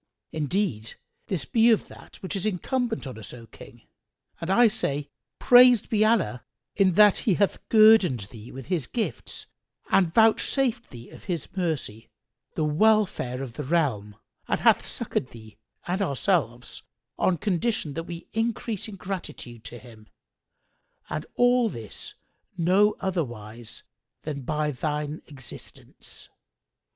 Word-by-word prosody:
Indeed, 150 - -2 0.3
this 170 -10 -2
be 230 - +4
of 225 - +3
that - - -14
which 190 - -4
is 195 - -2
incumbent 225 - -2
on 130 -4 -7
us, 105 +2 -9
O 115 -1 -12
King, 120 +1 -15 0.6
and 165 - -5
I 235 +5 +6
say, 145 -8 -2 0.3
Praised 245 -2 +6
be 215 -1 +3
Allah 215 - +1 0.3
in 190 -2 +3
that 210 +1 +6
He 190 - +4
hath 200 +1 +1
guerdoned 215 - +6
thee 110 -1 -11
with 135 0 -9
His 175 -7 -2
gifts 235 -3 -3 0.5
and 180 -4 +4
vouchsafed 225 +4 +2
thee 120 -1 -11
of - - -14
His 175 -6 -3
mercy, 155 - -3 0.5
the 155 - 0
welfare 155 - +2
of 125 -4 -7
the - - -2
realm; 130 -10 0 0.3
and - - -1
hath - - +5
succoured 125 - -2
thee 110 -2 -14 0.3
and 180 +3 -1
ourselves, 135 - -1 0.4
on 180 - +2
condition 200 -4 -1
that 165 +2 -4
we 170 0 -8
increase 225 -2 -2
in 210 - -8
gratitude 180 - -7
to 120 - -7
Him; 115 -3 -15 1.0
and 155 - -4
all 245 -1 +4
this 115 - -8 0.4
no 190 +5 +3
otherwise 120 - -4 0.4
than 145 -2 -4
by 150 +3 -1
thine 150 +3 -3
existence! 130 -6 -6
170 Hz, 140 wpm, -26 LUFS, 125-210 Hz, 1.0 s, I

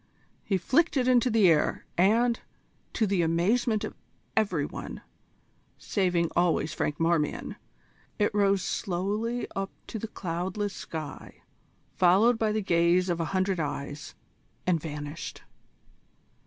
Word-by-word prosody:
He 195 - +1
flicked 300 - +2
it 255 -1 +2
into 250 -1 +4
the 220 -4 +5
air, 160 -3 +2
and, 230 +6 +3 0.5
to 225 - +2
the 195 -3 +1
amazement 205 +7 +1
of - - -4 0.4
every 185 -9 +1
one, - - -7 0.7
saving 180 -4 0
always 170 -3 +2
Franklin 155 +2 0
Marmion, 165 -3 0 0.6
it 205 -1 +1
rose 200 -2 +3
slowly 210 +6 -2
up 195 0 -2 0.2
to 225 - -6
the 225 - -4
cloudless 190 +3 -3
sky, 155 -4 -8 0.5
followed 205 +7 +4
by 220 -1 +2
the 215 -1 -1
gaze 175 +1 +3
of 170 -1 0
a 165 - 0
hundred 185 +1 0
eyes, 145 -1 -4 0.5
and 175 -4 +2
vanished. 150 0 -6
185 Hz, 130 wpm, -28 LUFS, 165-215 Hz, 0.7 s, the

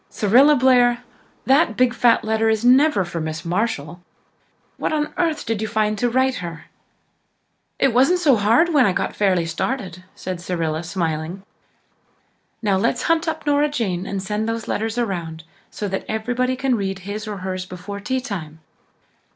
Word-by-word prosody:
Cyrilla 255 +8 +4
Blair, 245 -1 +4 0.4
that 275 -3 +3
big 250 -1 +3
fat 235 0 +3
letter 220 0 +1
is 220 +1 0
never 260 - +4
for 170 -1 -5
Miss 155 0 -5
Marshall! 175 -3 -2 0.8
What - - -2
on 300 -1 -1
earth 330 -4 -1
did 225 -2 -2
you 220 - -1
find 215 -1 0
to 245 - +1
write 260 +1 +1
her?" 170 -3 -7 1.1
"It 270 -3 +2
wasn't 270 +9 +4
so 305 -7 +4
hard 230 +11 +3
when 285 -4 +5
I 190 - +1
got - - -2
fairly 185 -4 +2
started," 180 +1 -4
said 185 -2 -6
Cyrilla, 165 -3 -2
smiling. 170 0 -3 1.2
"Now, 200 -3 +2
let's 190 - 0
hunt 330 0 +1
up 320 - -3
Nora 290 0 +2
Jane 195 -10 -2
and 195 -1 -3
send 210 +2 -2
the 225 -1 -4
letters 225 +2 -2
around 170 -8 -3 0.3
so 210 - -5
that 190 - -3
everybody 245 +4 -1
can 265 0 0
read 195 -4 -2
his 210 +2 -5
or 210 -1 -4
hers 185 -1 -4
before 185 +3 -7
tea 260 +6 -2
time. 160 - -6
215 Hz, 165 wpm, -21 LUFS, 185-255 Hz, 1.2 s, when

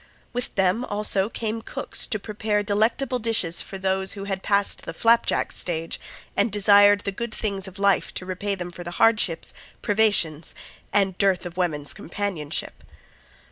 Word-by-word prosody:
With 245 0 -3
them 195 +4 +2
also 205 -2 +1
came 225 -1 -3
cooks - - -1
to 225 - -1
prepare 210 0 -1
delectable 225 +5 +1
dishes 215 -7 0
for 195 - -7
those 190 0 0
who 200 - -6
had 195 -1 -3
passed 200 0 +1
the - - -7
flap 230 0 +4
jack - - 0
stage, 165 -2 -3 0.4
and 205 +2 +2
desired 205 0 +6
the 200 - -2
good 235 +4 -4
things 200 -3 -1
of 190 0 -11
life 200 -1 +2
to 180 - -3
repay 195 +2 -2
them 180 -2 -6
for 175 - -8
the 175 - -6
hardships, 215 -7 +2 0.3
privations 200 -7 +1 0.4
and 195 -2 +2
dearth 195 -3 +2
of 175 -1 -7
woman's 155 -6 -1
companionship. 175 -5 -4
200 Hz, 165 wpm, -24 LUFS, 185-215 Hz, 0.4 s, desired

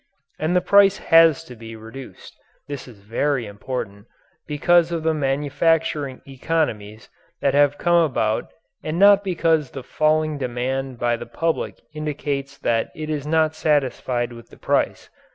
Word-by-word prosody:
And 160 +3 0
the 180 - +4
price 200 -1 +5
has 165 -1 +5
to 125 -6 -12
be 115 0 -10
reduced 115 +4 -11 0.3
(this 140 -3 -7
is 110 -5 -14
very 120 +5 -1
important) 105 0 -6 0.4
because 170 +3 +3
of 165 -2 -2
the 160 0 +2
manufacturing 145 0 0
economies 125 -7 -3 0.3
that 140 - +1
have 145 0 +3
come 175 0 +3
about 110 -8 -1 0.3
and 155 +2 -3
not 200 +1 +6
because 165 -6 +1
the 135 - -8
falling 155 0 0
demand 130 +1 -3
by 120 0 0
the - - -8
public 165 -1 -2
indicates 145 -2 -4
that 115 -4 0
it 155 0 -5
is 150 -1 -3
not 160 0 +2
satisfied 130 -5 0
with 115 0 -13
the - - -16
price. - - -1
145 Hz, 150 wpm, -22 LUFS, 125-160 Hz, 0.4 s, not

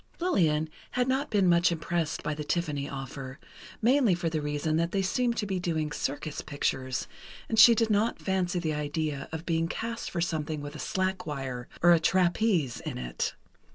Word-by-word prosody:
Lillian 160 - +2 0.3
had 250 0 +1
not 265 +3 0
been 200 -4 +3
much 175 0 +4
impressed 165 -1 -2
by 150 - -1
the 150 0 -5
Tiffany 150 -3 -1
offer, 135 0 -7 0.4
mainly 245 -5 +4
for 170 -2 -2
the 155 -1 -1
reason 150 +1 -1
that 170 +1 +1
they 195 -1 +1
seemed 235 +4 0
to 210 - 0
be 190 -2 -2
doing 160 -4 -1
circus 145 +1 -3
pictures, 130 -2 -2 0.4
and 225 - +1
she 230 +1 +10
did 225 0 +1
not 215 +3 +2
fancy 185 -2 -1
the 160 -3 -1
idea 150 -1 -2
of 160 +1 -5
being 165 -1 +1
cast 230 +5 -4
for 170 - -3
something 155 -2 -1
with 145 +1 -7
a - - -7
slack 185 0 -1
wire, 130 -4 -4 0.2
or 175 - +8
a 170 - +6
trapeze, 175 - +2
in - - -5
it. 60 -1 -3
165 Hz, 190 wpm, -28 LUFS, 150-190 Hz, 0.4 s, she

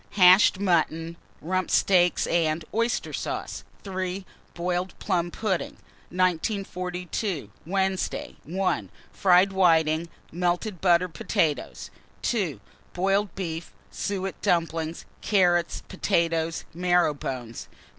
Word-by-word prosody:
Hashed 185 +1 +7
mutton, 165 -3 +1 0.3
rump 185 +4 -1
steaks 180 -2 +3
and 160 -1 +1
oyster 230 +1 0
sauce. - - -4 0.2
3. 190 -1 -4 0.3
Boiled 180 +1 -2
plum 175 -3 0
pudding. 190 -1 -2 0.4
1942. 180 - -2 0.2
Wednesday. 190 0 -1
1. 170 - -1 0.2
Fried 185 0 +4
whitings, 165 -3 +3 0.2
melted 175 +3 -1
butter, 180 -1 +4
potatoes. 155 0 -2 0.3
2. 185 - 0 0.3
Boiled 195 +1 +1
beef, 165 -3 -4 0.2
suet 195 -1 -3
dumplings, 165 -1 0 0.2
carrots, 175 -4 +2
potatoes, 165 -4 0
marrow 175 -2 +2
bones. 125 -5 -6
180 Hz, 95 wpm, -26 LUFS, 165-190 Hz, 0.4 s, Hashed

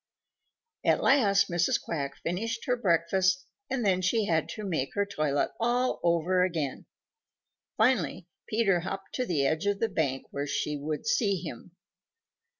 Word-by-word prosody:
At - - +2
last 205 -8 +4
Mrs. 175 -1 +1
Quack 140 -4 -4
finished 225 +7 -2
her 250 - +2
breakfast, 185 -2 +2 0.2
and 260 -4 -1
then 185 -2 +2
she 205 +4 +1
had 160 -5 +1
to 215 - -6
make 160 -9 -2
her 200 0 +2
toilet 155 -8 0
all 245 +2 +1
over 175 +2 +2
again. 160 -7 -2 0.9
Finally 190 - +1 0.2
Peter 210 -5 +2
hopped 195 +2 -6
to 250 -1 -1
the 145 -6 +1
edge 160 +7 0
of 205 0 +1
the 225 - +1
bank 140 -8 -1
where 140 +1 -3
she 150 +1 -1
would 150 +4 -4
see 220 -2 +2
him. 165 +1 -9
185 Hz, 150 wpm, -28 LUFS, 160-215 Hz, 0.9 s, last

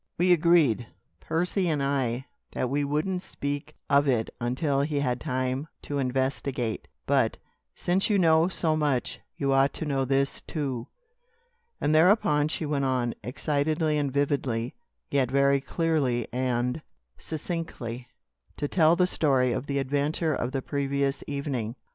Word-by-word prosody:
We 180 +1 +5
agreed 160 -9 +3 0.3
Percy 180 +2 0
and 150 -3 0
I 130 -2 0 0.3
that 125 - -1
we 145 +1 +1
wouldn't 155 +6 -1
speak 145 -2 -5
of 140 0 +4
it 120 -4 +1
until 135 +4 0
he 145 0 0
had 125 -3 -1
time 130 0 -1 0.2
to 145 -1 -3
investigate; 130 -2 -1 0.2
but, 135 -5 +2 0.4
since 185 +4 0
you 210 - +3
know 165 -2 +5
so 165 -4 0
much, 145 -5 0 0.2
you 140 -1 +1
ought 135 +1 +3
to 160 - -4
know 135 -2 0
this, 135 +1 +1
too." 135 -7 -3 0.9
And 150 - +1
thereupon 155 -3 +4
she 155 +1 -3
went 145 -2 0
on, 125 -3 0
excitedly 150 +4 0
and 140 -2 -1
vividly, 135 -4 0 0.4
yet 135 -3 +2
very 140 +1 +3
clearly 140 -6 0
and 125 +2 0 0.4
succinctly, 150 -7 -5 0.5
to 145 - -1
tell 160 +1 +4
the 180 - +3
story 135 -8 +2
of 125 - -3
the 140 - -1
adventure 145 +4 0
of 125 -2 -2
the 135 -1 -2
previous 140 -1 -1
evening. 135 -5 -3
140 Hz, 145 wpm, -27 LUFS, 130-155 Hz, 0.9 s, We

